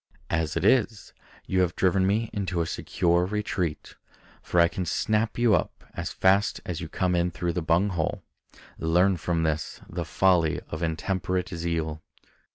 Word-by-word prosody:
As 80 -1 0
it 85 - -1
is, 110 -3 +2 0.3
you 95 0 +1
have 90 -1 0
driven 95 0 +2
me 110 +3 0
into 95 -4 -2
a 85 - +1
secure 85 +2 +1
retreat; 95 -5 -2 0.5
for 90 - 0
I 85 - +7
can 90 - -4
snap 110 +5 0
you 120 -2 +4
up 90 - -1
as - - -4
fast 100 +2 +2
as 85 -1 -4
you 80 - -6
come 90 +1 0
in 85 0 +2
through 85 0 -3
the 90 - -1
bung 85 +5 +2
hole. 85 -5 -2 0.6
Learn 90 +4 +3
from 85 -1 -1
this 80 -1 -2
the - - -4
folly 90 -5 +2
of 80 - -5
intemperate 90 +2 -1
zeal." 80 -2 -3
90 Hz, 165 wpm, -26 LUFS, 85-95 Hz, 0.6 s, I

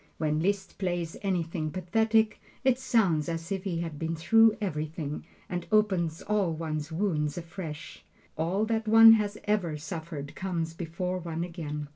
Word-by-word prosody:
When 155 -1 0
Liszt 195 +2 -1
plays 175 -3 -2
anything 170 -5 -1
pathetic, 220 +5 +1 0.2
it 260 -1 +3
sounds 195 - +2
as 165 +1 -4
if 195 0 -2
he 170 -3 -1
had 160 -3 -5
been 165 0 -2
through 225 +7 +5
everything, 155 -5 -3 0.2
and 180 -1 -4
opens 190 -7 +2
all 205 -5 +1
one's 155 -1 -4
wounds 160 -4 0
afresh. 165 -3 -7 0.3
All 175 +7 0
that 220 0 -1
one 225 +1 +9
has 210 -2 +3
ever 185 -7 0
suffered 160 -2 -6
comes 170 -4 -3
before 180 +2 -3
one 165 -1 -4
again. 150 -4 -5
170 Hz, 150 wpm, -28 LUFS, 160-205 Hz, 0.3 s, one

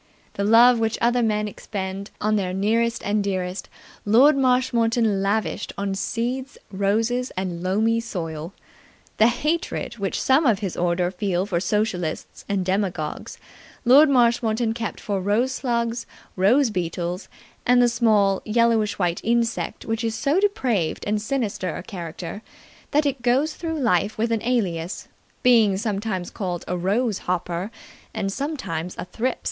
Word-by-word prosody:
The 200 - -2
love 230 +3 +6
which 225 -1 0
other 240 +1 +2
men 210 -2 +1
expend 195 -1 -5
on 215 +1 +1
their 185 -3 -1
nearest 230 +4 +1
and 205 0 +1
dearest 185 -1 -3 0.3
Lord 255 +8 +5
Marshmoreton 235 -5 +2
lavished 205 +1 -1
on 200 -1 -2
seeds, 245 +6 -3
roses 220 +6 0
and 180 -2 -3
loamy 220 +5 +1
soil. 165 -7 -5 0.7
The 220 - +6
hatred 300 -1 -2
which 195 -1 -2
some 270 +3 +3
of 220 -4 +4
his 195 -4 -4
order 175 +1 0
feel 190 -1 -1
for 180 -4 -1
Socialists 180 -3 -2
and 195 -2 0
Demagogues 185 -5 -2 0.5
Lord 280 +5 +7
Marshmoreton 235 -3 +2
kept 230 -2 -4
for 200 -2 -2
rose 215 +7 +1
slugs, 235 -2 -2 0.3
rose 225 +7 +3
beetles 175 0 -3 0.4
and 250 0 +4
the 245 - +5
small, 215 -5 +2
yellowish 220 -3 +2
white 175 -2 0
insect 235 0 -1
which 225 +1 -2
is 225 -1 -1
so 280 +10 +1
depraved 255 - 0
and 210 0 0
sinister 215 -7 -2
a - - -7
character 175 +1 -7 0.5
that 295 +1 +2
it 275 -3 -1
goes 265 +6 +2
through 320 -1 -4
life 215 - +1
with 230 +2 0
an 225 -2 0
alias 190 -8 -2 0.4
being 225 -6 +5
sometimes 200 -3 -3
called 180 -4 -4
a 180 - -1
rose 200 +5 0
hopper 180 +1 -2 0.5
and 195 0 -2
sometimes 195 - -4
a - - -4
thrip. 235 +7 -2
215 Hz, 145 wpm, -23 LUFS, 190-240 Hz, 0.7 s, Lord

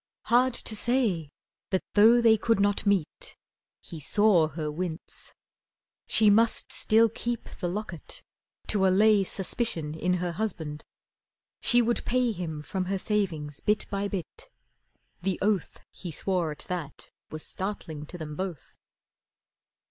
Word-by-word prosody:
Hard 250 +1 +3
to 220 - -1
say 215 - +1 0.4
That 190 -1 0
though 225 +3 +6
they 225 -1 +6
could 225 0 +1
not 205 +1 +1
meet 195 -6 -1 0.4
(he 165 - -9
saw 180 +1 +3
her 155 0 -4
wince) 165 +1 -6 0.8
She 220 - +4
still 205 - +7
must 230 +2 +2 0.3
keep 240 0 -4
the 175 - -2
locket 190 -3 -6 0.5
to 195 -2 +3
allay 205 +2 +4
Suspicion 185 -5 0
in 180 +3 0
her 180 -1 -2
husband. 165 -7 -4 0.8
She 240 0 +5
would 235 +1 0
pay 250 -1 +1
Him 160 -6 -5
from 185 +3 -3
her 195 +1 -1
savings 175 -9 -2
bit 210 0 0
by 200 0 -1
bit 190 -6 -6 0.7
the 190 0 -1
oath 200 -3 -1
He 180 - -8
swore 180 +1 -1
at 150 - -7
that 170 -5 -6 0.2
was 155 0 -4
startling 160 -6 -5
to 180 - -8
them 155 -2 -7
both. 185 -4 -6
190 Hz, 140 wpm, -27 LUFS, 160-215 Hz, 0.8 s, still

